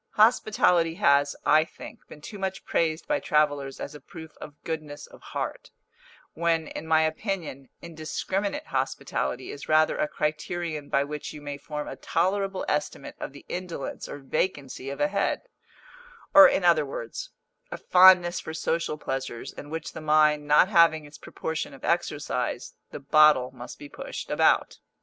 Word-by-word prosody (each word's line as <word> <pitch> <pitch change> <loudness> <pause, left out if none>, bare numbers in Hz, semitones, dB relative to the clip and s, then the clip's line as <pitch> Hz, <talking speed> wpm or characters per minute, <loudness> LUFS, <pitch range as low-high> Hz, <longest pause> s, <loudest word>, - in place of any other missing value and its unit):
Hospitality 205 -7 +3
has, 145 -6 +3
I 155 +1 +5
think, 165 - -12
been 150 - -13
too 205 +6 -9
much 190 0 -4
praised 160 -1 0
by 295 -1 +1
travellers 145 - 0
as 145 - -6
a 150 - -10
proof 160 -4 -12
of 145 - -10
goodness 155 -3 -5
of - - -17
heart, - - -5 0.6
when, 165 -1 0
in 160 - -7
my 160 0 +4
opinion, 155 - -3
indiscriminate 190 - -3
hospitality - - -3
is 145 - -9
rather 155 0 +3
a - - +1
criterion 155 0 -3
by 140 - +2
which 150 +1 -6
you 150 - -9
may 145 -1 -5
form 150 0 -6
a - - -6
tolerable 195 0 -1
estimate 150 -2 -3
of - - -5
the 140 - -14
indolence 175 -6 -5
or - - -6
vacancy 140 -2 -3
of 140 - -6
a 195 - +3
head; 200 0 -1 0.9
or, 295 -1 +11
in 195 - 0
other 170 -3 +5
words, 120 -5 -6 0.4
a - - -6
fondness 180 -1 +6
for 160 - -7
social 160 -1 -1
pleasures 135 -5 -5
in 145 - -10
which 160 0 -5
the - - -7
mind 150 -1 +3
not 150 +4 +6
having 165 -5 +4
its 145 0 -14
proportion 160 -3 -5
of 135 - -10
exercise, 145 -7 -2 0.2
the - - -8
bottle 145 -2 +4
must 125 -1 -10
be 145 - -10
pushed - - -7
about. - - +2
155 Hz, 165 wpm, -26 LUFS, 145-175 Hz, 0.9 s, or